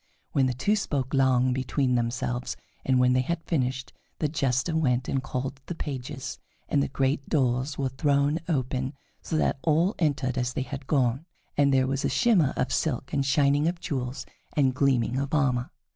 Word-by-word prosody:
Then 135 -2 +3
the 125 - -1
two 200 - +2
spoke 140 -10 -2
long 130 -2 +3
between 130 0 0
themselves, 120 +1 -1 0.3
and 130 -1 +2
when 125 0 +4
they 130 - +3
had 165 +5 -2
finished, 130 -5 -1 0.2
the 155 - 0
Jester 140 +1 0
went 130 -5 +1
and 135 - 0
called 135 +1 -4
the 175 - -4
pages, 130 -3 -5 0.3
and 145 - +2
the - - +1
great 135 +1 -1
doors 130 0 +1
were 135 -2 0
thrown 140 +3 +1
open, 130 -2 -1 0.3
so 160 - -2
that 145 - +1
all 165 +6 +2
entered 135 -5 0
as 125 0 -1
they 130 - -1
had 135 0 -7
gone, 135 +2 +1 0.3
and 140 -1 +4
there 130 -1 +4
was 135 +1 -1
shimmer 190 - +3
of 130 - 0
silk 135 -4 -1
and 140 - +2
shining 145 +2 +3
of 170 0 -1
jewels 135 -4 -3 0.3
and 135 -3 +3
gleaming 130 -2 +2
of 140 +2 -1
armor. 125 -4 +1
135 Hz, 180 wpm, -27 LUFS, 130-145 Hz, 0.3 s, when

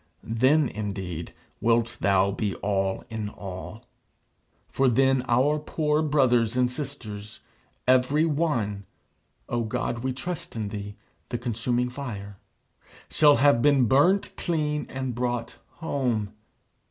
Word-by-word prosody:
Then 130 +6 +3
indeed 95 -6 -5 0.3
wilt 115 +1 +2
thou 100 0 +3
be 100 0 -2
all 95 -1 -1
in 110 -2 -3
all. 100 +4 -8 0.8
For 135 - +1
then 135 +2 +3
our 135 +6 +3
poor 150 0 0
brothers 125 -6 +2
and 125 -1 +2
sisters, 110 -7 -6 0.5
every 130 +5 +4
one 125 -11 -1 0.6
O 120 - -1
God, 120 +1 -2
we 130 +2 -2
trust 145 +5 -5
in 110 -3 -3
thee, 100 -1 -6 0.3
the 120 - -2
Consuming 120 +1 -1
Fire 105 -7 -7 0.7
shall 150 -2 +6
have 135 -1 +4
been 140 -2 +4
burnt 150 - +3
clean 150 -3 -1
and 130 -1 -3
brought 120 0 -2 0.2
home. 125 - -2
125 Hz, 120 wpm, -26 LUFS, 105-140 Hz, 0.8 s, shall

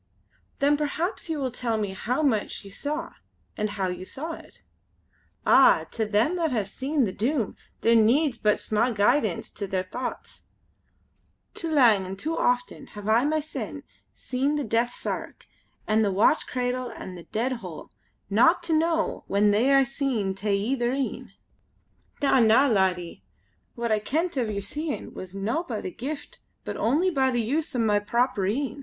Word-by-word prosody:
"Then 290 +1 +3
perhaps 320 +6 -2
you 320 - -1
will 265 -3 -2
tell 235 -2 -1
me 205 -3 -2
how 250 +9 -1
much 220 -7 0
you 195 - -10
saw, 300 - -4 0.4
and 210 0 -1
how 195 -2 -2
you 180 0 -4
saw 290 - -5
it?" - - -13 0.8
"Ah! - - +6
to 220 -2 -2
them 220 +12 +2
that 330 -2 +1
have 215 -6 0
seen 265 +5 0
the 195 - -2
Doom 235 +2 -1 0.3
there 230 - +4
needs 240 +4 +3
but 210 -1 +2
sma' 215 +3 +1
guidance 215 - +1
to 200 - -5
their 185 -1 -1
thochts. 245 +7 -6 1.1
Too 335 -7 -4
lang, 235 -10 +5
an' 190 - -5
too 315 +11 -3
often 245 -3 0
hae 210 - -10
I 220 +5 +3
mysen 310 0 -3 0.3
seen 270 +3 -1
the 295 - -1
death 230 +1 +1
sark - - -5 0.4
an' 215 +1 +2
the 205 -2 +2
watch 205 +11 +3
candle 250 0 -2
an' 185 - -8
the 175 -2 -10
dead 235 +4 -1
hole, 180 -5 -9 0.4
not 240 - +4
to 340 -1 -1
know 325 +1 +1
when 205 +1 +3
they 230 +7 +3
are 275 -1 +5
seen 260 -8 -1
tae 200 +1 -1
ither 240 +4 0
een. 270 -1 -3 0.9
Na, 270 -1 +4
na! 230 +4 +5
laddie, 185 - 0 0.5
what 235 -1 -2
I 215 - +3
kent 320 +11 -1
o' 260 - +1
yer 205 -2 -3
seein' 295 +9 -4
was 185 0 -8
no 215 +11 -1
by 240 -11 -4
the 185 - -5
Gift 285 +8 -6 0.3
but - - -4
only 310 +11 +2
by 265 -4 +2
the 240 -2 0
use 290 +6 -1
o' - - 0
my 210 -2 +3
proper 235 -2 0
een. 260 +4 -2
240 Hz, 175 wpm, -26 LUFS, 210-285 Hz, 1.1 s, Ah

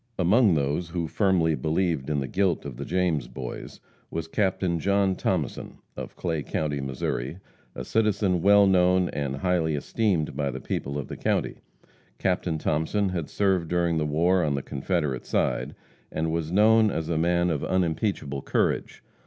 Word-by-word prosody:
Among 95 +2 +4
those 75 +4 -1
who 85 -1 -2
firmly 90 -3 +2
believed 80 -2 -1
in 75 -2 0
the 65 - -3
guilt 95 -2 0
of 65 -4 -7
the 70 - -5
James 85 -7 0
boys, 65 -1 -7 0.3
was 80 0 -4
Captain 95 -2 0
John 100 +1 +2
Thomason, 80 -9 -2 0.2
of - - -7
Clay 80 -3 -2
county, 75 -1 -2
Missouri, 65 +2 -3 0.4
a 60 - -5
citizen 100 - +1
well 100 +2 +6
known 90 -1 +3
and 70 -2 -3
highly 80 0 0
esteemed 85 - 0
by 70 -1 -1
the 65 0 -5
people 70 +2 -3
of 70 - -4
the - - -7
county. - - -1 0.6
Captain 90 -3 0
Thomason 80 +7 0
had 85 -5 -3
served 95 -4 +1
during 85 -1 +1
the 75 - 0
war 85 +5 +2
on 75 -2 0
the 70 - -3
Confederate 70 -2 -2
side, - - 0 0.4
and 80 +1 -1
was 80 -1 -2
known 110 +3 +5
as 80 -5 -3
a 85 - -1
man 85 +2 +2
of 75 - -2
unimpeachable 85 -5 -1
courage. - - -1
85 Hz, 165 wpm, -26 LUFS, 75-95 Hz, 0.6 s, well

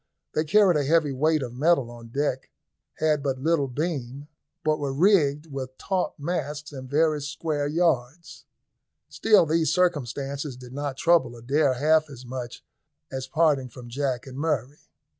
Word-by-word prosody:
They 155 - 0
carried 190 0 +5
a 145 - +1
heavy 155 0 +2
weight 155 +2 +1
of 120 -2 -6
metal 135 -2 +2
on 120 -1 -11
deck, 130 +1 -2 0.5
had 155 -2 +1
but 135 -2 -1
little 145 +1 +1
beam, 140 -1 -4 0.3
but 155 0 +1
were 140 -2 -2
rigged 150 -2 +3
with 130 -1 -6
taut 185 -5 -1
masts 150 -1 -4
and 130 -2 -8
very 155 +1 +2
square 150 0 -2
yards. 160 -1 -1 0.6
Still 210 -6 +4
these 160 +1 +1
circumstances 140 -5 -1
did 125 0 -11
not 140 -1 -4
trouble 165 -8 +3
Adair 135 +3 +1
half 155 +3 +3
as 130 -3 -11
much 125 -1 -7 0.5
as 130 -1 -4
parting 145 -3 +2
from 120 0 -11
Jack 130 -1 -2
and 135 0 -8
Murray. 145 -3 -1
145 Hz, 155 wpm, -25 LUFS, 130-160 Hz, 0.6 s, carried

